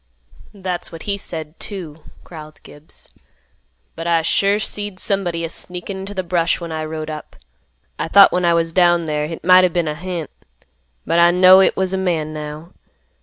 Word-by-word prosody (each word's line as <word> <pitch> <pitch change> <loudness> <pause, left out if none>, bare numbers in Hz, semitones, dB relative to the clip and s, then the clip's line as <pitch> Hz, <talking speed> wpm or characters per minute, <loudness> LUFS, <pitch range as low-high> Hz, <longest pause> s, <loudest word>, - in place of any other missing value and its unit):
"That's 185 -3 -5
what 165 -1 -9
he 200 - -2
said, 160 -5 -6
too," 165 -7 -6 0.2
growled 155 -2 -12
Gibbs; 145 +2 -13 0.9
"but 165 +1 -6
I 165 -1 +2
sure 200 +4 +2
seed 205 -2 -4
somebody 175 -4 -1
a - - -5
sneakin' 180 +3 -5
into 195 +2 -8
th' 185 -2 -4
brush 170 -1 +1
when 170 -2 -7
I 155 0 -3
rode 155 0 -5
up. 155 -1 -9 0.6
I - - -2
thought 200 +4 +7
when 180 - 0
I 170 -1 +3
was 165 -1 -1
down 175 -2 +3
there 150 -1 -2
hit 165 0 -8
might 185 +1 +6
o' 180 - +4
been 170 -1 -1
a 150 - -1
hant; 170 -1 -6 0.7
but 170 - +1
I 170 0 +6
know 185 +2 +7
hit 190 - +3
was 190 0 0
a 190 - -1
man, 165 -5 -1
now. 155 +2 -8
170 Hz, 190 wpm, -19 LUFS, 160-185 Hz, 0.9 s, thought